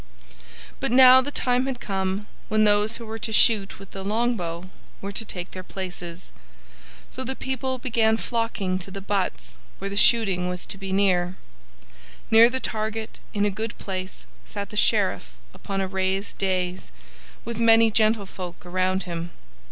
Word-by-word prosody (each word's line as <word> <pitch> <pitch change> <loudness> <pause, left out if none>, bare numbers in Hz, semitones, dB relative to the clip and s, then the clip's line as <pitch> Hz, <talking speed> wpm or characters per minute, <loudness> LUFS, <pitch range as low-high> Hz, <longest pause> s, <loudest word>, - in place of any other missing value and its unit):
But 270 -2 -1
now 260 0 +8
the 270 - -4
time 250 -2 0
had 260 -3 -3
come 190 0 -2 0.2
when 215 0 +2
those 210 +2 +3
who 235 - -9
were 225 0 -6
to 225 - -3
shoot 210 -2 +4
with 195 0 -13
the 195 - -7
longbow 195 -5 -2 0.3
were 200 - -5
to 200 - -1
take 180 -4 -6
their 185 - -7
places, 180 -2 -7 0.8
so 260 - -4
the 265 +1 -3
people 260 0 -2
began 225 -3 +2
flocking 225 -6 -2
to 190 - -7
the 195 +1 -6
butts 60 - -3 0.2
where 195 +1 -5
the - - -4
shooting 195 -5 +4
was 180 0 -4
to 195 - -5
be. 195 -1 -5
Near 190 -2 +3 1.1
the 235 +3 +6
target, 220 -1 -4 0.2
in 205 0 +2
a 205 - +1
good 220 +2 -5
place, 185 - -6 0.2
sat - - -6
the - - -9
Sheriff - - +2 0.2
upon 195 -1 -4
a 190 - -1
raised 190 +1 -2
dais, 185 - -1 0.5
with 235 0 -5
many 225 -1 +6
gentlefolk 200 -5 -1
around 185 +1 0
him. 170 -1 -5
200 Hz, 160 wpm, -24 LUFS, 185-225 Hz, 1.1 s, now